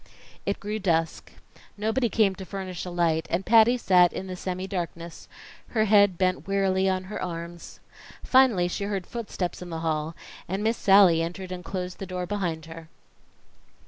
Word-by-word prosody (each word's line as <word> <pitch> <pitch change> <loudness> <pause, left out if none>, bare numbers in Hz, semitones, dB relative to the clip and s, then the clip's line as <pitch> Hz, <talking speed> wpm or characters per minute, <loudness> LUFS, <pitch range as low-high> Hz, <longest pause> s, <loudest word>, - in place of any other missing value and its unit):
It 200 - -1
grew 210 +2 -4
dusk; 165 -4 -1 0.5
nobody 225 +4 0
came 210 -3 +3
to 190 - -9
furnish 185 -2 -6
a - - -5
light, 165 -2 0
and 180 +3 -1
Patty 230 +2 +5
sat 180 -6 +4
in 190 - -5
the 185 -1 -6
semi 185 +1 -4
darkness, 170 -3 -6 0.4
her 220 -2 +1
head 205 -3 +5
bent 185 +1 0
wearily 195 -1 +1
on 185 0 -1
her 190 +3 -6
arms. 170 -1 -7 0.4
Finally 250 -9 +4
she 200 - -3
heard 195 -3 -3
footsteps 205 -7 -5
in 180 - -7
the 165 -1 -5
hall, 160 0 -2 0.3
and 190 +3 -3
Miss 225 +1 +1
Sallie 195 -4 +6
entered 180 +3 -5
and 180 -1 -6
closed 180 0 -5
the 195 - -6
door 180 0 -4
behind 175 -5 -3
her. 160 0 -11
185 Hz, 175 wpm, -26 LUFS, 170-200 Hz, 0.5 s, Sallie